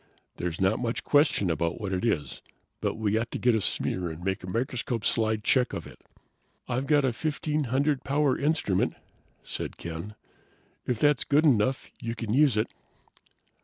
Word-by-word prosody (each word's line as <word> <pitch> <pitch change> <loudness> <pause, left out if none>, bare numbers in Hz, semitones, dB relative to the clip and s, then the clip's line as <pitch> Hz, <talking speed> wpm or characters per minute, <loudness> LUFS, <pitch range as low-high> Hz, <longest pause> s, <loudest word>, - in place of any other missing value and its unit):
There's 90 -1 -3
not 95 +2 +2
much 120 -1 -2
question 145 - +3
about 85 +1 -1
what 100 -3 -3
it 90 - -1
is, 85 -11 -1 0.4
but - - -1
we 110 0 +1
ought 115 0 -3
to - - -4
get 125 -1 +3
a 110 - +1
smear 90 -2 -1
and 80 +2 -8
make 95 -1 -2
a 90 - -6
microscope 120 +1 -2
slide 110 -2 +1
check 125 +2 +3
of - - -4
it." - - -13 0.7
"I've 130 +2 -1
got 145 -2 +4
a 130 -2 +1
1500 145 -1 0
power 140 -1 +2
instrument," 140 - +1 0.5
said - - -5
Ken. 85 +5 -6 0.7
"If 125 - 0
that's 145 +3 +3
good 150 +3 +3
enough 130 -2 +2
you 115 -1 -4
can 110 -2 -3
use 140 -4 +4
it." 110 - 0
115 Hz, 170 wpm, -28 LUFS, 100-140 Hz, 0.7 s, got